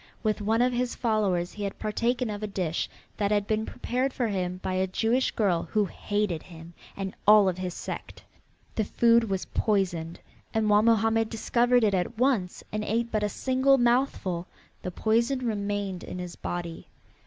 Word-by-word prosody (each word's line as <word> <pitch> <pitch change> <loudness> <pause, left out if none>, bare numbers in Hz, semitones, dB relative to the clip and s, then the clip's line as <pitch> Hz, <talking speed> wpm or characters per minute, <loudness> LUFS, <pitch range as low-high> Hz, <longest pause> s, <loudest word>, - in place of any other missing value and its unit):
With 215 -1 0
one 225 +3 +2
of 250 0 +2
his 245 0 -1
followers 205 -7 0
he 210 - -6
had 200 - -3
partaken 235 +2 -1
of 205 0 -5
a 215 - -2
dish 180 -5 -2 0.3
that 205 -2 +1
had 205 -1 +2
been 215 +1 -1
prepared 255 +2 -2
for 240 -3 -1
him 180 -2 -2
by 185 - -1
a 185 +1 +1
Jewish 230 +7 +1
girl 185 -6 0
who 210 -2 +3
hated 205 -2 -2
him 165 -1 -12 0.2
and 195 -1 -4
all 210 -1 +8
of 185 -1 -1
his 180 -2 -4
sect. - - -7 0.5
The 220 - 0
food 230 +2 +4
was 190 -1 -1
poisoned, 175 -6 -1 0.4
and 215 -1 +2
while 205 0 +6
Mohammed 225 0 +3
discovered 240 +2 +2
it 205 -2 +3
at 190 +5 -1
once 235 -8 +1
and 215 0 -2
ate 230 +2 -1
but 215 - 0
a 210 - 0
single 260 +4 +3
mouthful, 240 -8 +1 0.3
the - - -4
poison 235 +7 +1
remained 205 -4 -2
in - - -6
his 180 -1 -6
body. 170 -2 -5
210 Hz, 180 wpm, -27 LUFS, 185-235 Hz, 0.5 s, all